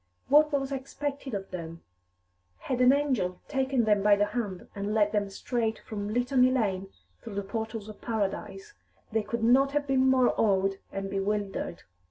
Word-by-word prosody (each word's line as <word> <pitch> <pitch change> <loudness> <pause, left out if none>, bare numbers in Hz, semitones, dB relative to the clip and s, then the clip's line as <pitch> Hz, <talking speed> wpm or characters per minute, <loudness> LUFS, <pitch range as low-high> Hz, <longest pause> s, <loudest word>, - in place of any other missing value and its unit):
What 300 +2 +6
was 275 -1 -1
expected 275 -1 -4
of 195 -1 -6
them? 165 -2 -7 0.7
Had 255 -1 -2
an 250 +1 +7
angel 260 -11 0
taken 265 -3 +1
them 210 -2 +3
by 205 0 +6
te 205 - +2
hand 205 -4 -3
and 205 +1 -3
led 210 -1 +3
them 205 -2 0
straight 225 +2 -2
from 205 -1 -5
Litany 250 +2 +3
Lane 200 -7 0 0.3
through 225 -3 -8
the 200 - -2
portals 220 +1 -4
of 215 - -11
paradise, 230 - -3 0.4
they 220 0 +1
could 230 +2 -4
not 270 +4 +4
have 295 -1 +1
been 265 -1 +3
more 260 -1 +4
awed 195 -2 +2
and 195 0 -4
bewildered. 195 -2 -2
220 Hz, 170 wpm, -28 LUFS, 200-265 Hz, 0.7 s, an